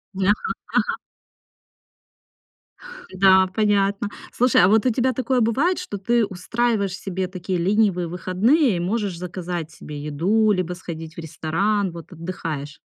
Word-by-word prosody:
Ага, 195 Hz, +1 st, +3 dB, 0.5 s
ага. -, -, 0 dB, 2.2 s
Да, 190 Hz, 0 st, +5 dB
понятно. 205 Hz, -1 st, +1 dB, 0.2 s
Слушай, 250 Hz, -5 st, +4 dB
а -, -, +7 dB
вот 220 Hz, +4 st, +3 dB
у -, -, +5 dB
тебя 255 Hz, +3 st, +1 dB
такое 260 Hz, 0 st, 0 dB
бывает, 275 Hz, +12 st, +2 dB
что 205 Hz, -, -5 dB
ты 235 Hz, +3 st, +2 dB
устраиваешь 200 Hz, +1 st, -1 dB
себе 190 Hz, -1 st, -3 dB
такие 185 Hz, 0 st, -3 dB
ленивые 190 Hz, -1 st, +2 dB
выходные 190 Hz, -, +2 dB
и -, -, -2 dB
можешь 195 Hz, 0 st, -1 dB
заказать 175 Hz, -2 st, -5 dB
себе 150 Hz, -1 st, -8 dB
еду, 190 Hz, +9 st, +2 dB
либо 180 Hz, -2 st, -1 dB
сходить 165 Hz, -2 st, -8 dB
в -, -, -8 dB
ресторан, 180 Hz, +5 st, -1 dB
вот 170 Hz, +2 st, -11 dB
отдыхаешь? 165 Hz, -4 st, -6 dB
190 Hz, 135 wpm, -22 LUFS, 175-215 Hz, 2.2 s, а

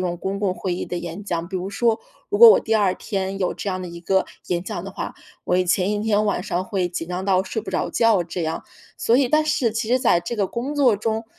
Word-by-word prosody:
种 175 Hz, -1 st, -1 dB
公 195 Hz, +3 st, -4 dB
共 195 Hz, -3 st, +1 dB
会 185 Hz, -1 st, -3 dB
议 -, -, -3 dB
的 175 Hz, -, -4 dB
演 175 Hz, +3 st, -6 dB
讲。 170 Hz, -4 st, -3 dB
比 190 Hz, -, -10 dB
如 185 Hz, +2 st, -4 dB
说， 230 Hz, +2 st, +1 dB, 0.3 s
如 410 Hz, -, -1 dB
果 470 Hz, 0 st, +11 dB
我 -, -, +6 dB
第 220 Hz, -, -1 dB
二 200 Hz, -4 st, +3 dB
天 195 Hz, -2 st, -3 dB
有 185 Hz, -, 0 dB
这 200 Hz, -, -5 dB
样 185 Hz, 0 st, -3 dB
的 180 Hz, -, -5 dB
一 170 Hz, 0 st, -9 dB
个 190 Hz, +2 st, +1 dB, 0.2 s
演 175 Hz, 0 st, -1 dB
讲 185 Hz, -5 st, -4 dB
的 195 Hz, -, -6 dB
话， -, -, -6 dB, 0.3 s
我 180 Hz, -, +1 dB
一 185 Hz, -, +2 dB
前 185 Hz, +3 st, +2 dB
一 205 Hz, -, -1 dB
天 215 Hz, -1 st, +2 dB
晚 200 Hz, -3 st, 0 dB
上 185 Hz, -2 st, -2 dB
会 190 Hz, -3 st, -1 dB
紧 165 Hz, -1 st, -5 dB
张 180 Hz, +1 st, -4 dB
到 190 Hz, -1 st, +3 dB
睡 220 Hz, -, -3 dB
不 -, -, -7 dB
着 -, -, -1 dB
觉 220 Hz, -6 st, +3 dB
这 175 Hz, +1 st, -4 dB
样。 160 Hz, 0 st, -3 dB, 0.3 s
所 235 Hz, -, +2 dB
以 265 Hz, -2 st, +3 dB
但 305 Hz, +2 st, +3 dB
是 270 Hz, -7 st, +1 dB
其 225 Hz, +1 st, -2 dB
实 255 Hz, +1 st, +2 dB
在 230 Hz, -9 st, +4 dB
这 175 Hz, +7 st, -4 dB
个 200 Hz, -4 st, 0 dB
工 260 Hz, +5 st, -4 dB
作 255 Hz, -7 st, +4 dB
中， 220 Hz, +1 st, -2 dB
195 Hz, 295 characters per minute, -22 LUFS, 180-225 Hz, 0.3 s, 果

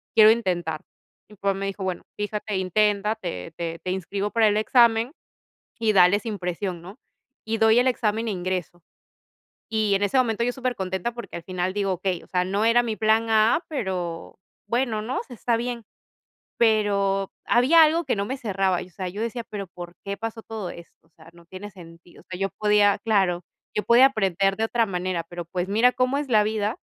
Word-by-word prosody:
quiero 215 Hz, -1 st, +8 dB
intentar". 175 Hz, -8 st, -1 dB, 0.5 s
Mi 210 Hz, -, -15 dB
papá 200 Hz, 0 st, 0 dB
me 195 Hz, +1 st, -4 dB
dijo: 195 Hz, 0 st, -5 dB
"Bueno, 185 Hz, -2 st, -3 dB, 0.2 s
fíjate, 210 Hz, -1 st, -3 dB
intenta. 210 Hz, +3 st, +1 dB
Te 90 Hz, -, -6 dB
te 165 Hz, -1 st, -4 dB
te 185 Hz, -, -2 dB
inscribo 195 Hz, +2 st, -3 dB
para 225 Hz, -1 st, +4 dB
el 210 Hz, 0 st, +2 dB
examen 235 Hz, +3 st, +3 dB, 0.7 s
y 225 Hz, -2 st, +2 dB
dale 185 Hz, 0 st, +5 dB
sin 210 Hz, -1 st, -5 dB
presión, 180 Hz, 0 st, -3 dB
¿no?" 190 Hz, +7 st, -11 dB, 0.5 s
Y 225 Hz, 0 st, -1 dB
doy 220 Hz, +1 st, +5 dB
el 260 Hz, -, +3 dB
examen, 225 Hz, -2 st, 0 dB
e -, -, 0 dB
ingreso, 180 Hz, -2 st, -4 dB, 0.9 s
y 215 Hz, -2 st, +1 dB
en 195 Hz, -, -2 dB
ese 200 Hz, +6 st, 0 dB
momento, 235 Hz, -2 st, +1 dB
yo 245 Hz, -, 0 dB
supercontenta, 235 Hz, -5 st, -3 dB
porque 235 Hz, 0 st, -8 dB
al 170 Hz, -, -7 dB
final 185 Hz, +1 st, -2 dB
digo: 200 Hz, -1 st, 0 dB
"Okey, 180 Hz, 0 st, -2 dB
o -, -, -16 dB
sea, 180 Hz, -1 st, 0 dB
no 200 Hz, +3 st, 0 dB
era 230 Hz, +1 st, +4 dB
mi 225 Hz, -2 st, -2 dB
plan 220 Hz, +1 st, +2 dB
A, 220 Hz, +9 st, +3 dB
pero 185 Hz, -, -4 dB, 0.3 s
bueno, 235 Hz, -2 st, 0 dB
¿no? 250 Hz, +4 st, -3 dB
O -, -, -8 dB
sea, 250 Hz, -, -11 dB
está 235 Hz, +1 st, 0 dB
bien". 235 Hz, 0 st, -4 dB, 0.7 s
Pero 200 Hz, -3 st, +2 dB
había 290 Hz, +7 st, +6 dB
algo 320 Hz, +2 st, +2 dB
que -, -, 0 dB
no 200 Hz, 0 st, -2 dB
me 265 Hz, +6 st, -4 dB
cerraba, 195 Hz, -6 st, 0 dB
o -, -, -17 dB
sea, 185 Hz, +1 st, -5 dB
yo 200 Hz, +4 st, -6 dB
decía: 235 Hz, +1 st, -3 dB
"Pero, 200 Hz, -2 st, -5 dB
¿por 175 Hz, 0 st, -10 dB
qué 200 Hz, -, -3 dB
pasó 225 Hz, 0 st, -6 dB
todo 215 Hz, -5 st, -6 dB
esto? 170 Hz, -1 st, -13 dB
O -, -, -37 dB
sea, 160 Hz, 0 st, -17 dB
no 170 Hz, 0 st, -18 dB
tiene 190 Hz, +4 st, -9 dB
sentido?". 170 Hz, -2 st, -15 dB
O -, -, -24 dB
sea, 185 Hz, -1 st, -6 dB
yo 195 Hz, -, +1 dB
podía 210 Hz, -1 st, +4 dB
claro, 190 Hz, -5 st, +1 dB, 0.3 s
yo 210 Hz, -, 0 dB
podía 245 Hz, +3 st, +7 dB
aprender 195 Hz, -5 st, 0 dB
de 220 Hz, -, +1 dB
otra 230 Hz, 0 st, +1 dB
manera, 180 Hz, -3 st, -2 dB
pero, 175 Hz, -1 st, -6 dB
pues, 180 Hz, +1 st, -3 dB
mira 225 Hz, +5 st, +4 dB
cómo 255 Hz, +2 st, +1 dB
es 290 Hz, -1 st, -3 dB
la 215 Hz, -3 st, +5 dB
vida 215 Hz, +1 st, -1 dB
205 Hz, 205 wpm, -24 LUFS, 185-225 Hz, 0.9 s, quiero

